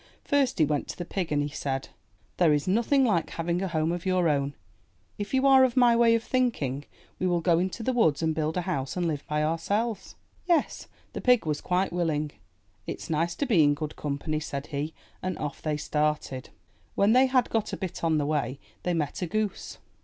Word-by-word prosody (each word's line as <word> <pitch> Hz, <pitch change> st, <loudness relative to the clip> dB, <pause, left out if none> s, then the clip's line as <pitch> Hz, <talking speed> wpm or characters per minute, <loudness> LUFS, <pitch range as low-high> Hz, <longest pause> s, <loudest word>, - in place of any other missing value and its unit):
First 280 Hz, -3 st, +1 dB
he 155 Hz, -, +4 dB
went 145 Hz, -1 st, -1 dB
to -, -, -6 dB
the 175 Hz, -, -4 dB
pig 180 Hz, -2 st, -3 dB
and 145 Hz, -1 st, +2 dB
he 145 Hz, -, -3 dB
said: 135 Hz, -2 st, -3 dB, 0.2 s
'* 95 Hz, -, -37 dB
There 165 Hz, -4 st, +4 dB
is 145 Hz, +2 st, 0 dB
nothing 235 Hz, +7 st, +3 dB
like 185 Hz, -9 st, +1 dB
having 170 Hz, +2 st, -2 dB
a 195 Hz, -, -1 dB
home 160 Hz, -2 st, 0 dB
of 175 Hz, 0 st, -3 dB
your 185 Hz, -2 st, +2 dB
own. 140 Hz, -2 st, 0 dB, 0.6 s
If 205 Hz, -, -4 dB
you 265 Hz, +1 st, +2 dB
are 265 Hz, -1 st, +7 dB
of 260 Hz, 0 st, +1 dB
my 240 Hz, -2 st, +6 dB
way 230 Hz, -1 st, +5 dB
of 230 Hz, -, -1 dB
thinking, 150 Hz, -, -1 dB, 0.3 s
we 185 Hz, -, +1 dB
will 175 Hz, -1 st, +2 dB
go 170 Hz, 0 st, +3 dB
into 190 Hz, +5 st, -2 dB
the 260 Hz, -, 0 dB
woods 165 Hz, -, +2 dB
and 160 Hz, 0 st, +2 dB
build 155 Hz, +2 st, -1 dB
a -, -, +1 dB
house 170 Hz, -5 st, -3 dB
and 175 Hz, -1 st, 0 dB
live 150 Hz, -3 st, -2 dB
by 150 Hz, 0 st, 0 dB
ourselves/' 200 Hz, +8 st, -1 dB, 0.3 s
Yes, 340 Hz, -4 st, +1 dB, 0.3 s
the -, -, -5 dB
pig 250 Hz, -6 st, +4 dB
was 150 Hz, -1 st, -1 dB
quite 180 Hz, 0 st, 0 dB
willing. 155 Hz, -4 st, 0 dB, 0.6 s
'*It's -, -, -5 dB
nice 165 Hz, +2 st, 0 dB
to 285 Hz, -, -1 dB
be 205 Hz, -, +4 dB
in 145 Hz, 0 st, +4 dB
good 150 Hz, 0 st, -5 dB
company, 150 Hz, +1 st, -2 dB
said 140 Hz, -2 st, -5 dB
he, 145 Hz, +3 st, -3 dB, 0.3 s
and 185 Hz, -1 st, -3 dB
off 150 Hz, -2 st, -5 dB
they 155 Hz, -1 st, -1 dB
started. 150 Hz, -3 st, -1 dB, 0.5 s
When 200 Hz, +2 st, +4 dB
they 260 Hz, +2 st, +6 dB
had 255 Hz, -1 st, +2 dB
got 220 Hz, -2 st, 0 dB
a -, -, -3 dB
bit 185 Hz, -4 st, -5 dB
on 160 Hz, -2 st, +2 dB
the 145 Hz, -, 0 dB
way, 140 Hz, -3 st, -1 dB, 0.2 s
they 180 Hz, -1 st, -1 dB
met 150 Hz, 0 st, -2 dB
a 180 Hz, -, -1 dB
goose. 215 Hz, +2 st, -3 dB
170 Hz, 220 wpm, -27 LUFS, 150-215 Hz, 0.6 s, are